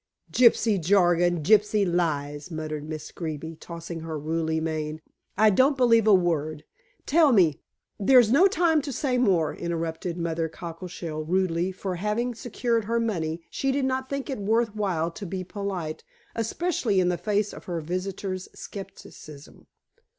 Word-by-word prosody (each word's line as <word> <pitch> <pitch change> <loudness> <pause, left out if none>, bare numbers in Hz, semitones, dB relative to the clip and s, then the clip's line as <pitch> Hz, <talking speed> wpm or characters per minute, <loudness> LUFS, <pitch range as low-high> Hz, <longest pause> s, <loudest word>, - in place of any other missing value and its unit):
"Gypsy 230 -5 +4
jargon, 175 -2 +3
gypsy 210 +2 +4
lies," 150 -4 -1
muttered 155 -2 -5
Miss 155 -1 -6
Greeby, 160 -1 -5
tossing 170 0 -7
her 160 -1 -5
ruddy 160 +1 -1
mane. 155 -1 -3 0.4
"I 215 +1 +6
don't 265 +7 +3
believe 230 -3 +4
a 215 - +7
word. 155 -4 0 0.4
Tell 310 -1 +4
me 175 - +3 0.2
" - - -53
"There's 245 -4 +7
no 330 +9 +6
time 340 -5 +2
to 285 - -5
say 255 -1 0
more," 185 -10 +2
interrupted 165 0 -3
Mother 165 -1 -2
Cockleshell 165 -1 -6
rudely, 180 0 +1
for, 185 -1 -4
having 210 +6 -1
secured 230 -1 -1
her 230 +2 0
money, 170 -7 -2
she 270 - 0
did 270 0 0
not 260 0 -1
think 275 -1 -3
it 270 -6 -4
worth 220 +2 +1
while 175 -6 -1
to 200 - -8
be 185 +1 -4
polite, 185 -5 -5 0.3
especially 230 - 0
in 180 -1 +3
the 180 - +1
face 210 -1 0
of - - -11
her 175 -2 -3
visitor's 185 +3 -4
scepticism. 155 -6 -11
185 Hz, 155 wpm, -26 LUFS, 165-225 Hz, 0.4 s, a